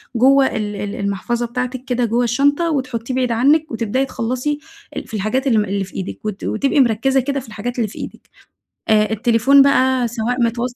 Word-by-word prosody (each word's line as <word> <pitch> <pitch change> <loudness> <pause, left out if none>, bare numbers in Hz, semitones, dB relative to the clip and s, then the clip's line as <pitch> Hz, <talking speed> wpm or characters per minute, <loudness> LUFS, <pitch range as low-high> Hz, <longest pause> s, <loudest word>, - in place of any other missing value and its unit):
جوه 270 +3 +5
ال 210 -1 -3
ال 205 0 -4
المحفظة 200 +4 -2
بتاعتك 250 +2 -4
كده 245 -2 0
جوه 235 +2 +1
الشنطة، 285 +7 +2
وتحطيه 255 -4 -3
بعيد 255 -1 0
عنك 290 +7 +2
وتبدئي 230 +3 -1
تخلصي 255 +4 -2 0.4
ال - - -5
في - - -15
الحاجات 220 +6 -1
اللي 235 -4 +3
اللي 200 +1 -1
في 190 - -12
إيدك 190 +3 -6
وت 210 -2 -4
وتبقي 275 +6 0
مركزة 265 +2 +3
كده 275 +2 -1
في 260 - -11
الحاجات 225 +3 -5
اللي 230 -3 0
في 200 - -12
إيدك. - - -9 0.6
آآ، 215 -1 +3
التليفون 235 +5 +4
بقى 260 -2 +3
سواء 240 +2 -2
متوصل 240 +1 -1
240 Hz, 190 wpm, -19 LUFS, 220-265 Hz, 0.6 s, جوه